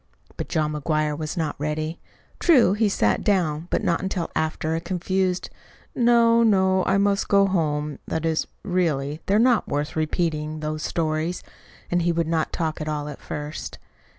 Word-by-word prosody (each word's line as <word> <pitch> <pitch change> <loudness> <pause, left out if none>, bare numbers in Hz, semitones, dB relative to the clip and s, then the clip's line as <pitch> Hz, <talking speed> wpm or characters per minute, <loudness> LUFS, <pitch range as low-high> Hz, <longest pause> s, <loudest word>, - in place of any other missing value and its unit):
But - - -5
John 155 -2 0
McGuire 150 0 0
was 155 +3 -5
not 155 -3 -1
ready. 155 +2 -3 0.4
True, 255 - +5
he 210 0 +2
sat 105 - +1
down 170 -5 +1
but - - 0
not 170 - +1
until 185 -3 -3
after 160 0 -1
a 165 - -2
confused 185 +1 -1 0.4
"No, 235 -1 +4
no, 190 -4 +3
I - - +2
must 200 0 +1
go 200 -1 +5
home 150 -6 -1
that 160 0 -2
is, 160 -1 0 0.2
really, 155 -5 -1
they're 200 - +3
not 240 0 +3
worth 145 +1 -2
repeating 155 -1 -1
those 155 0 -3
stories." 160 +2 -1 0.5
And 175 0 +2
he 170 +1 +2
would 170 0 0
not 160 -1 0
talk 160 -1 -2
at 155 - -3
all 150 -1 -3
at 145 - -9
first. 150 +1 -6
165 Hz, 170 wpm, -24 LUFS, 155-190 Hz, 0.5 s, True